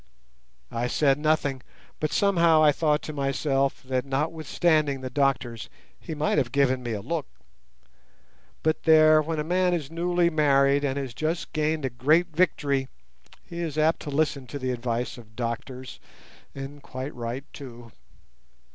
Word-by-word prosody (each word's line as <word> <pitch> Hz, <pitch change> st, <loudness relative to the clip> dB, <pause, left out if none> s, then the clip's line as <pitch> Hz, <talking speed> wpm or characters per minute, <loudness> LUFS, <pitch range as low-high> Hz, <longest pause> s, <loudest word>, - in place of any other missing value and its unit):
I 120 Hz, 0 st, -1 dB
said 140 Hz, +2 st, +2 dB
nothing, 150 Hz, -3 st, +1 dB, 0.4 s
but 155 Hz, -, -1 dB
somehow 170 Hz, -5 st, +4 dB
I 150 Hz, -, +7 dB
thought 150 Hz, 0 st, +1 dB
to 155 Hz, -, -6 dB
myself 135 Hz, -1 st, 0 dB
that 130 Hz, -1 st, -1 dB
notwithstanding 155 Hz, 0 st, 0 dB
the 130 Hz, -1 st, -5 dB
doctors 125 Hz, -5 st, 0 dB, 0.3 s
he 160 Hz, -, -6 dB
might 150 Hz, 0 st, +1 dB
have 120 Hz, -4 st, -1 dB
given 135 Hz, -2 st, +2 dB
me 120 Hz, -2 st, -3 dB
a 100 Hz, -2 st, -4 dB
look; 165 Hz, -4 st, -3 dB, 1.4 s
but 155 Hz, 0 st, +1 dB
there, 155 Hz, -1 st, +7 dB
when 160 Hz, +1 st, -3 dB
a -, -, 0 dB
man 180 Hz, +2 st, +2 dB
is 155 Hz, -3 st, -5 dB
newly 175 Hz, +1 st, +1 dB
married 140 Hz, -2 st, +3 dB
and 140 Hz, -1 st, -1 dB
has 135 Hz, -4 st, -4 dB
just 160 Hz, +5 st, -3 dB
gained 155 Hz, -1 st, 0 dB
a 130 Hz, -, -2 dB
great 155 Hz, +7 st, +2 dB
victory, 140 Hz, -6 st, +1 dB, 0.6 s
he 170 Hz, -, -8 dB
is 160 Hz, -3 st, -3 dB
apt 155 Hz, +1 st, +3 dB
to 150 Hz, -, -7 dB
listen 140 Hz, -2 st, 0 dB
to 130 Hz, -, -6 dB
the 130 Hz, -2 st, -2 dB
advice 120 Hz, 0 st, -3 dB
of 110 Hz, -1 st, -16 dB
doctors, 125 Hz, +2 st, -5 dB, 0.6 s
and 140 Hz, +1 st, -8 dB
quite 130 Hz, +2 st, -6 dB
right 120 Hz, +3 st, -5 dB
too. 120 Hz, -4 st, -10 dB
140 Hz, 155 wpm, -26 LUFS, 130-155 Hz, 1.4 s, I